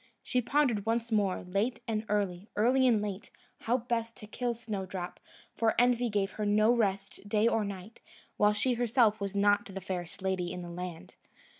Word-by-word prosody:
She 250 Hz, -, +1 dB
pondered 245 Hz, -5 st, +1 dB
once 230 Hz, +1 st, 0 dB
more, 205 Hz, -4 st, +1 dB
late 200 Hz, +7 st, -1 dB
and 220 Hz, -1 st, -1 dB
early, 200 Hz, -2 st, -1 dB
early 255 Hz, +5 st, +4 dB
and 220 Hz, -4 st, +3 dB
late, 205 Hz, +1 st, -5 dB, 0.3 s
how 240 Hz, +3 st, +1 dB
best 230 Hz, -1 st, -3 dB
to -, -, -9 dB
kill 240 Hz, +3 st, -2 dB
Snowdrop; 190 Hz, -5 st, -5 dB, 0.3 s
for 225 Hz, -1 st, +1 dB
envy 245 Hz, 0 st, +3 dB
gave 205 Hz, -2 st, 0 dB
her 210 Hz, -, -3 dB
no 215 Hz, +3 st, +4 dB
rest, 200 Hz, -2 st, -2 dB
day 215 Hz, +2 st, +3 dB
or 225 Hz, -2 st, +2 dB
night, 200 Hz, +2 st, -7 dB, 0.4 s
while 210 Hz, 0 st, +4 dB
she 230 Hz, +5 st, +1 dB
herself 235 Hz, -3 st, +2 dB
was 200 Hz, 0 st, -3 dB
not 205 Hz, 0 st, +3 dB
the 195 Hz, -1 st, -6 dB
fairest 185 Hz, -1 st, -5 dB
lady 185 Hz, -2 st, -1 dB
in 180 Hz, -, -5 dB
the 175 Hz, 0 st, -7 dB
land. 180 Hz, 0 st, -7 dB
210 Hz, 180 wpm, -30 LUFS, 195-230 Hz, 0.4 s, early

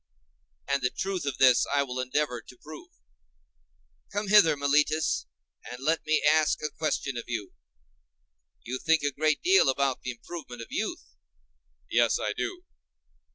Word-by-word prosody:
And 140 Hz, 0 st, 0 dB
the 125 Hz, -, +1 dB
truth 190 Hz, -3 st, -3 dB
of 140 Hz, -, -2 dB
this 130 Hz, -2 st, +5 dB
I 140 Hz, 0 st, +2 dB
will 130 Hz, -2 st, -5 dB
endeavor 130 Hz, -1 st, -1 dB
to 125 Hz, -, -16 dB
prove. 155 Hz, +4 st, -12 dB, 1.2 s
Come 205 Hz, 0 st, -3 dB
hither, 185 Hz, -8 st, +6 dB
Meletus, 145 Hz, -, +1 dB, 0.4 s
and 125 Hz, -, -8 dB
let 155 Hz, +5 st, 0 dB
me 155 Hz, -, +2 dB
ask 155 Hz, 0 st, +3 dB
a 150 Hz, -, -2 dB
question 140 Hz, -4 st, -2 dB
of 120 Hz, -, -5 dB
you. 115 Hz, -5 st, -5 dB, 1.1 s
You 130 Hz, +2 st, -4 dB
think 160 Hz, -2 st, +2 dB
a 145 Hz, -, +1 dB
great 155 Hz, +2 st, 0 dB
deal 380 Hz, -, +5 dB
about 135 Hz, -1 st, 0 dB
the -, -, -5 dB
improvement 125 Hz, -1 st, -8 dB
of -, -, -14 dB
youth? -, -, -4 dB, 0.7 s
Yes, -, -, +2 dB
I -, -, -2 dB
do. -, -, -4 dB
145 Hz, 155 wpm, -27 LUFS, 125-155 Hz, 1.2 s, hither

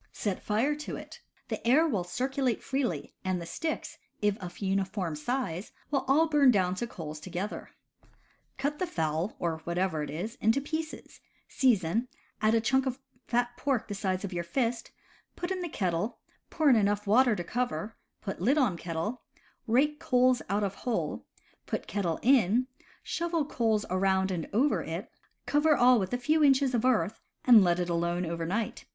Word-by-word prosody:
Set 200 Hz, -4 st, -3 dB
fire 225 Hz, +8 st, +1 dB
to 300 Hz, +1 st, -5 dB
it. -, -, -10 dB, 0.3 s
The -, -, -4 dB
air 305 Hz, +7 st, +5 dB
will 205 Hz, -, 0 dB
circulate 255 Hz, +6 st, -1 dB
freely, 255 Hz, -, -2 dB
and 185 Hz, -1 st, -1 dB
the 170 Hz, -, -6 dB
sticks, 315 Hz, -, -4 dB, 0.2 s
if 205 Hz, -1 st, +2 dB
of 180 Hz, -1 st, -8 dB
uniform 190 Hz, -3 st, -1 dB
size, 190 Hz, -, -3 dB, 0.2 s
will 275 Hz, -2 st, 0 dB
all 305 Hz, +5 st, +4 dB
burn 295 Hz, -4 st, +5 dB
down 185 Hz, -6 st, +3 dB
to 240 Hz, -, -1 dB
coals 155 Hz, -7 st, -7 dB
together. 185 Hz, +5 st, -5 dB, 0.9 s
Cut 285 Hz, +3 st, -2 dB
the 365 Hz, -, 0 dB
fowl, 160 Hz, -, -1 dB
or 165 Hz, -2 st, -2 dB
whatever 170 Hz, -1 st, -1 dB
it 150 Hz, -, -4 dB
is, 185 Hz, +9 st, -5 dB
in 220 Hz, -, +5 dB
pieces, 315 Hz, +4 st, -4 dB, 0.3 s
season, 230 Hz, -3 st, +2 dB, 0.3 s
add 215 Hz, +1 st, +4 dB
a 225 Hz, -, +3 dB
chunk 265 Hz, +4 st, +2 dB
of 260 Hz, -1 st, -2 dB, 0.3 s
fat 245 Hz, 0 st, 0 dB
pork 270 Hz, -5 st, 0 dB
the 205 Hz, -, -4 dB
size 190 Hz, -1 st, -2 dB
of 200 Hz, -2 st, -4 dB
your 175 Hz, 0 st, -2 dB
fist, 235 Hz, +5 st, -1 dB, 0.5 s
put 350 Hz, +1 st, -4 dB
in 375 Hz, -1 st, -2 dB
the 350 Hz, -, -3 dB
kettle, 185 Hz, -, -1 dB, 0.3 s
pour 315 Hz, -2 st, +1 dB
in 265 Hz, -, +7 dB
enough 205 Hz, -1 st, +1 dB
water 235 Hz, +3 st, +4 dB
to 175 Hz, -, -3 dB
cover, 235 Hz, 0 st, -2 dB, 0.3 s
put 195 Hz, -4 st, -5 dB
lid 260 Hz, +10 st, +3 dB
on 230 Hz, -, +2 dB
kettle, 170 Hz, +8 st, -3 dB, 0.5 s
rake 285 Hz, +6 st, +2 dB
coals 250 Hz, 0 st, +3 dB
out 205 Hz, +2 st, +1 dB
of 195 Hz, -1 st, -1 dB
hole, 235 Hz, +2 st, -3 dB, 0.4 s
put -, -, -3 dB
kettle 175 Hz, -6 st, -1 dB
in, 245 Hz, -2 st, +4 dB, 0.4 s
shovel 335 Hz, -3 st, -1 dB
coals 225 Hz, -6 st, 0 dB
around 190 Hz, 0 st, +2 dB
and 170 Hz, -3 st, -3 dB
over 260 Hz, +8 st, +2 dB
it, -, -, -5 dB, 0.3 s
cover 295 Hz, +1 st, +3 dB
all 245 Hz, -1 st, +6 dB
with 190 Hz, -2 st, -2 dB
a 245 Hz, -, 0 dB
few 305 Hz, +5 st, +2 dB
inches 270 Hz, -2 st, +4 dB
of 240 Hz, 0 st, +1 dB
earth, 230 Hz, -4 st, +1 dB, 0.2 s
and 235 Hz, -5 st, +8 dB
let 175 Hz, -1 st, +2 dB
it 175 Hz, -, -1 dB
alone 170 Hz, +1 st, 0 dB
over 165 Hz, 0 st, -3 dB
night. 210 Hz, +4 st, -2 dB
220 Hz, 180 wpm, -29 LUFS, 185-265 Hz, 0.9 s, and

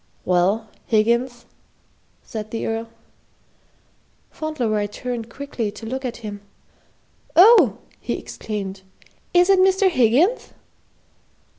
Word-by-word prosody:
"Well, 185 Hz, +5 st, +1 dB, 0.2 s
Higgins," 235 Hz, +2 st, +1 dB, 0.8 s
said 215 Hz, -2 st, -7 dB
the 225 Hz, -, -4 dB
Earl. 225 Hz, 0 st, -3 dB, 1.4 s
Fauntleroy 240 Hz, -10 st, -2 dB
turned 235 Hz, +1 st, -6 dB
quickly 245 Hz, -4 st, -4 dB
to 225 Hz, -, -10 dB
look 260 Hz, +4 st, -4 dB
at 250 Hz, -2 st, -4 dB
him. 205 Hz, -1 st, -6 dB, 0.9 s
"Oh!" 355 Hz, -, +7 dB, 0.2 s
he -, -, -3 dB
exclaimed, 200 Hz, -3 st, -6 dB, 0.5 s
"is 355 Hz, 0 st, +6 dB
it 390 Hz, -1 st, +5 dB
Mr. 380 Hz, 0 st, +4 dB
Higgins?" 285 Hz, -, +2 dB
235 Hz, 100 wpm, -22 LUFS, 215-310 Hz, 1.4 s, Oh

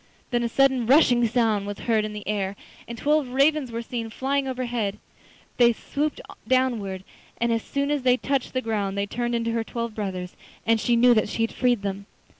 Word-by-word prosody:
Then 240 Hz, -1 st, +1 dB
a 235 Hz, -, -1 dB
sudden 265 Hz, -2 st, +2 dB
rushing 245 Hz, -4 st, +5 dB
sound 220 Hz, -3 st, +1 dB
was 205 Hz, -1 st, -5 dB
heard 225 Hz, -2 st, +1 dB
in 215 Hz, -, -5 dB
the 210 Hz, -1 st, -8 dB
air, 200 Hz, -2 st, -1 dB, 0.3 s
and 235 Hz, -, -7 dB
twelve 295 Hz, +2 st, +2 dB
ravens 275 Hz, +1 st, +2 dB
were 230 Hz, +1 st, -4 dB
seen 230 Hz, -2 st, -4 dB
flying 270 Hz, +4 st, -1 dB
overhead. 240 Hz, -5 st, -2 dB, 0.6 s
They 240 Hz, -1 st, +5 dB
swooped 295 Hz, +6 st, -3 dB, 0.3 s
downwards, 225 Hz, -8 st, 0 dB, 0.4 s
and 235 Hz, 0 st, +1 dB
as 230 Hz, -, 0 dB
soon 280 Hz, +3 st, -2 dB
as 295 Hz, -2 st, 0 dB
they 250 Hz, 0 st, +3 dB
touched 275 Hz, 0 st, -1 dB
the 255 Hz, -, 0 dB
ground 205 Hz, -4 st, -2 dB
they 200 Hz, -, 0 dB
turned 240 Hz, +3 st, -2 dB
into 230 Hz, 0 st, -1 dB
her 230 Hz, 0 st, -1 dB
twelve 235 Hz, 0 st, -4 dB
brothers, 185 Hz, -4 st, -4 dB, 0.3 s
and 225 Hz, 0 st, +3 dB
she 240 Hz, +2 st, +2 dB
knew 245 Hz, +1 st, +6 dB
that 215 Hz, -2 st, +1 dB
she 225 Hz, -, -1 dB
had 225 Hz, -, -1 dB
freed 245 Hz, -4 st, +1 dB
them. 200 Hz, 0 st, -4 dB
235 Hz, 205 wpm, -25 LUFS, 215-255 Hz, 0.6 s, knew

